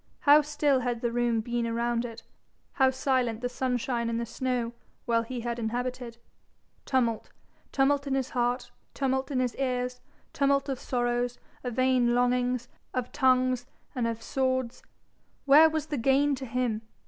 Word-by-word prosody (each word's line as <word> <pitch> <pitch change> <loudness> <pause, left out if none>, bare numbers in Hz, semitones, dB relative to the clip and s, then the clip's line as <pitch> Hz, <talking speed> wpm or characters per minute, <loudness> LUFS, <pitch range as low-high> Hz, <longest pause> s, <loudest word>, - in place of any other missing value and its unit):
How 295 +1 +7
still 290 -2 +1
had 245 -2 -2
the 235 - 0
room 240 -1 +1
been 235 +1 -2
around 235 +1 0
it, 230 -1 -8 0.5
how 265 -1 +4
silent 255 -3 0
the 245 - 0
sunshine 245 -2 -1
and 230 0 -1
the 235 - -2
snow, 245 -1 -2 0.3
while 230 -1 +2
he 240 +1 -5
had 240 0 -3
inhabited 240 +1 -3 0.7
tumult 235 -4 0 0.4
tumult 280 +1 +2
in 270 - 0
his 265 -2 -2
heart, 245 0 -1 0.2
tumult 265 0 0
in 270 -3 -1
his 250 -2 0
ears, 250 -1 -2 0.3
tumult 275 0 +2
of 265 -2 -2
sorrows, 245 0 -1 0.3
of 245 -3 -4
vain 255 -2 +3
longings, 245 0 +1 0.3
of 250 -1 -2
tongues 255 -2 +2 0.3
and 240 -2 -1
of 230 0 -4
swords! 260 -2 -1 0.6
Where 300 +3 +8
was 315 -1 -2
the 300 -2 -3
gain 275 +4 +3
to 265 -1 -5
him? 235 -2 -1
250 Hz, 160 wpm, -28 LUFS, 240-265 Hz, 0.7 s, Where